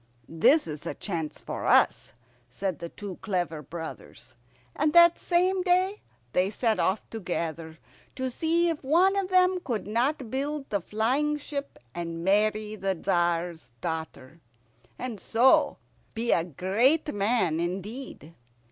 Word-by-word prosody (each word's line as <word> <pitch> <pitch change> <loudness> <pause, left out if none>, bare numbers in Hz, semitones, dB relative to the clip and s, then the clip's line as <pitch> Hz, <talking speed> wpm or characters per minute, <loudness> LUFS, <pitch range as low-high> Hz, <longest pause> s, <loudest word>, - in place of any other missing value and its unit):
"This 275 - +4
is 150 -2 -7
a - - -4
chance 165 -6 -4
for - - -5
us," - - +3 0.4
said 185 +4 -3
the 170 - -6
two 200 -1 -8
clever 175 -6 -2
brothers; 160 +2 -9 0.4
and 305 0 +1
that 340 0 +7
same 365 +2 +2
day 370 +3 +1 0.3
they 185 +2 +2
set 220 +1 0
off 190 +3 0
together, 165 -6 -4 0.4
to 260 -1 -2
see 335 +5 +1
if 320 -3 -3
one 350 +8 +4
of 390 -2 -1
them 370 0 +4
could 225 -6 -2
not 240 +3 -1
build 285 +1 -2
the 200 -2 0
flying 260 - 0
ship 285 -1 -6 0.2
and 165 -1 -5
marry 215 +2 +1
the 195 -2 -1
Tzar's 170 -6 -1
daughter, 160 -2 -6 0.6
and 240 -5 -5
so 235 +7 +3 0.4
be 235 +1 0
a 165 - +3
great 225 - +1
man 200 -6 +1
indeed. 185 - -5
215 Hz, 140 wpm, -27 LUFS, -, 0.6 s, that